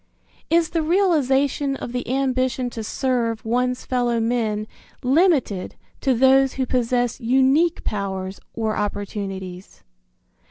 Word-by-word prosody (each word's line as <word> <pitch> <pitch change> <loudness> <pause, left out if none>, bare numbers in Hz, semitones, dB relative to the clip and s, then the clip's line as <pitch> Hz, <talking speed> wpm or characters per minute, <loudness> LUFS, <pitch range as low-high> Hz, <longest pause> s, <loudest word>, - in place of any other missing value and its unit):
Is 335 0 +2
the 330 - 0
realization 290 -6 +2
of 240 - -6
the 245 -1 -4
ambition 255 -2 0
to 225 - -5
serve 235 -2 -1
one's 250 +2 0
fellow 245 -2 0
men 225 -2 0 0.4
limited 270 - +2 0.2
to 265 -2 +1
those 265 +2 +4
who 265 - -1
possess 245 -1 0
unique 265 +8 +3
powers 190 -2 -3 0.2
or 220 -1 -1
opportunities? 195 -3 -5
250 Hz, 115 wpm, -22 LUFS, 220-270 Hz, 0.4 s, those